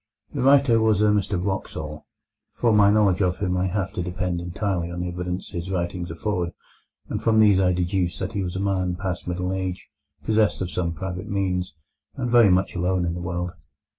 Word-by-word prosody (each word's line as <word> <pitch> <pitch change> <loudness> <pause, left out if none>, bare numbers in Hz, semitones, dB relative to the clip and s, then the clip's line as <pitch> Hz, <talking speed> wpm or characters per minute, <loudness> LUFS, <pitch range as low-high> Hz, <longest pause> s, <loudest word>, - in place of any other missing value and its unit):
The 140 - -2
writer 135 -3 +5
was 110 -3 +3
a 105 0 +4
Mr 100 -2 0
Wraxall. 80 -5 -4 0.5
For 115 -2 +2
my 105 -1 +6
knowledge 100 -3 +3
of 90 -1 +1
him 90 -3 -1
I 90 +1 +1
have 95 +1 -2
to 100 - -2
depend 90 -1 -2
entirely 90 -1 -2
on 85 0 -4
the 90 - -2
evidence 90 +1 -4
his 85 +1 -5
writings 85 -1 -2
afford, 85 0 -2 0.5
and - - -3
from 110 -1 +3
these 105 -3 +6
I 90 -1 +3
deduce 90 0 0
that - - -4
he 100 - -1
was 90 -1 -3
a - - -2
man 95 -2 0
past 90 -1 -4
middle 90 +1 -2
age, 95 -1 -4 0.4
possessed 110 -1 +2
of 90 -2 -3
some 85 +1 -1
private 95 +4 -5
means, 90 -4 -1 0.4
and 125 - -2
very 120 -4 +7
much 95 +1 +2
alone 90 0 +1
in 85 - -1
the 90 - -5
world. 90 0 -3
90 Hz, 200 wpm, -24 LUFS, 90-100 Hz, 0.5 s, very